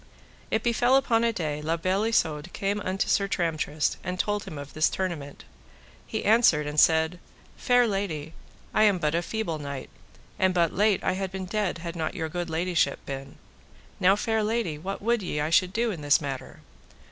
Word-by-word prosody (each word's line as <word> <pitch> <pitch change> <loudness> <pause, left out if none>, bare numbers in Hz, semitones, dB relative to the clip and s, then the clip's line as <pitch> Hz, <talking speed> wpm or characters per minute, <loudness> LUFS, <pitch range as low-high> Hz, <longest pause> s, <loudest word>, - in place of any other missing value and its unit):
It 220 - 0
befell 240 +2 +3
upon 235 -4 +3
a 235 - +3
day 155 -7 -3
La 160 +2 -1
Beale 185 +5 0
Isoud 160 -7 0
came 200 +1 -1
unto 190 0 -1
Sir 200 - +2
Tramtrist, 155 -5 -1
and 180 0 -3
told 205 0 -1
him 155 - -8
of 145 0 -8
this 155 0 +3
tournament. 165 -7 -4 0.6
He 220 - -3
answered 210 -9 +4
and 150 +1 -1
said: 160 +2 +4 0.4
Fair 245 0 +3
lady, 180 -8 -3 0.4
I - - +3
am 205 -3 +4
but 155 -3 0
a 170 - +1
feeble 175 -4 -3
knight, 140 -2 -6 0.5
and 185 -1 +2
but 170 -2 +2
late 205 0 +2
I - - +2
had 190 0 -3
been 190 -1 -5
dead 200 -2 -1
had 170 0 -6
not 160 +1 -3
your 160 -3 -3
good 175 +1 -4
ladyship 165 -3 +1
been. 135 0 -7 0.6
Now, 190 +2 +5
fair 220 +1 0
lady, 210 -8 -1
what 195 +4 -5
would 235 0 +2
ye 160 -5 -3
I 150 +2 -1
should 180 +2 +4
do 230 +2 0
in 170 -6 -6
this 145 -1 +4
matter? 135 -3 -6
180 Hz, 195 wpm, -26 LUFS, 155-210 Hz, 0.6 s, Now